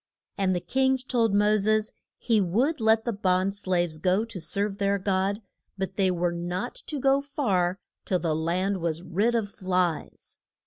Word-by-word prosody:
And 190 -2 +1
the - - 0
king 265 +8 +1
told 245 -4 0
Mo 210 +1 +4
ses 215 +1 +1 0.3
he 225 -3 +2
would 235 - +1
let 220 0 +3
the 235 - -1
bond 190 -1 +1
slaves 175 -5 -1
go 185 +6 +2
to 225 -6 -8
serve 200 +5 -2
their 200 0 +2
God, 195 +2 -1 0.3
but 190 0 -3
they 195 -2 +2
were 175 -1 0
not 175 +7 -3
to 295 - -2
go 275 +1 +3
far 195 -11 0 0.3
till 185 - +1
the 165 -3 -1
land 180 +5 0
was 165 -1 -2
rid 205 +7 +1
of 210 -3 -1
flies. 180 -4 -2
195 Hz, 175 wpm, -26 LUFS, 180-220 Hz, 0.3 s, Mo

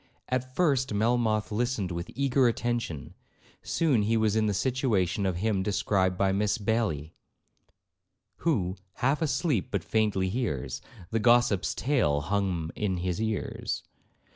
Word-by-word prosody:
At 130 0 -2
first 135 -9 +2
Melmoth 110 -1 +1
listened 110 -4 -1
with 85 0 -4
eager 135 -1 +3
attention; 115 - -2 0.5
soon 145 -9 +1
he 110 +2 +2
was 110 -1 +2
in 110 -1 +2
the 105 - +1
situation 105 -6 +1
of 95 - -1
him 100 +1 0
described 95 -2 +1
by 95 0 +2
Miss 105 +2 +1
Baillie, 100 -9 -1 1.2
'Who, 100 - 0 0.2
half 135 +5 0
asleep, 140 - 0
but 100 -5 -2
faintly 105 -4 +1
hears, 95 - -2 0.3
The 115 - +1
gossip's 120 -4 +3
tale 115 - +1
hum 90 -2 -1
in 95 -3 -1
his 90 +3 -2
ears.' 110 -2 -2
110 Hz, 135 wpm, -28 LUFS, 95-120 Hz, 1.2 s, eager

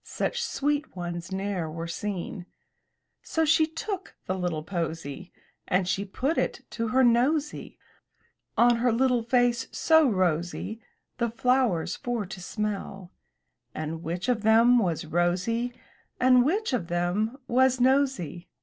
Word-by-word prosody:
Such - - -2
sweet 290 -1 -1
ones 175 0 -5
ne'er 190 -4 -2
were 165 +1 -5
seen/' 180 0 -5 0.7
So 320 0 0
she 315 0 +4
took 370 +4 -5
the 185 - -1
little 175 -4 -2
posy, 165 -1 -4 0.4
And 180 0 +1
she 195 +2 -1
put 265 - -1
it - - -2
to 230 0 -2
her 260 +4 +3
nosy, 270 +6 +1 0.8
On 240 0 +5
her 245 +1 +2
little 250 +1 +2
face 240 0 +1
so 320 -3 +4
rosy, 185 +3 -1 0.4
The 235 -1 +1
flowers 240 -6 +1
for 240 -4 -3
to 185 0 -9
smell; 195 -2 -4 0.6
And 155 +1 -4
which 175 +3 -4
of 245 -3 +1
them 230 +3 +5
was 170 -7 -1
Rosy, 185 +9 0 0.5
And 250 -1 +6
which 375 - 0
of 210 -9 -1
them 180 +8 -1
was 260 +1 +3
nosy. 255 - +1
220 Hz, 135 wpm, -27 LUFS, 175-250 Hz, 0.8 s, And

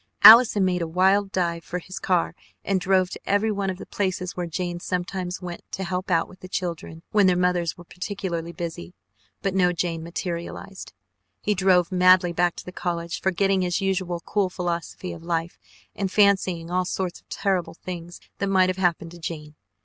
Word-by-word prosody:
Allison 220 -3 +9
made 180 -1 0
a 165 - -1
wild 190 +4 +3
dive 170 -3 -1
for 180 - -4
his 185 +1 -7
car 180 -3 +1 0.3
and 195 -1 +1
drove 185 0 +2
to - - -6
every 205 +2 +1
one 200 -1 -1
of 185 - -3
the - - -9
places 185 -2 -2
where 180 -1 -3
Jane 175 +1 -3
sometimes 180 +1 -3
went 175 -1 -6
to 190 - -3
help 185 +1 -3
out 165 -2 +2
with 185 - -16
the 185 - -9
children 170 -3 -4
when 205 -2 +5
their 180 -1 +3
mothers 180 -2 +1
were 175 - -11
particularly 180 -2 -4
busy, 175 0 -6 0.5
but 195 -2 0
no 180 -2 +3
Jane 170 -1 -2
materialized. 170 +3 -6 0.5
He 210 - +2
drove 185 -2 +3
madly 185 -1 +5
back 175 0 +1
to - - -9
the 180 - -7
college, 170 -1 -3
forgetting 190 +1 +2
his 180 0 0
usual 185 -3 -1
cool 200 -3 +1
philosophy 175 0 -4
of 165 - -10
life 165 0 -3 0.4
and 195 -2 -2
fancying 190 -5 +2
all 180 0 +1
sorts 185 -1 -3
of - - -45
terrible 190 -5 -1
things 175 -1 -8 0.2
that 200 - 0
might 185 -1 +4
have 185 - -2
happened 175 -2 0
to 175 - -12
Jane. 155 -2 -6
180 Hz, 190 wpm, -24 LUFS, 170-190 Hz, 0.5 s, Allison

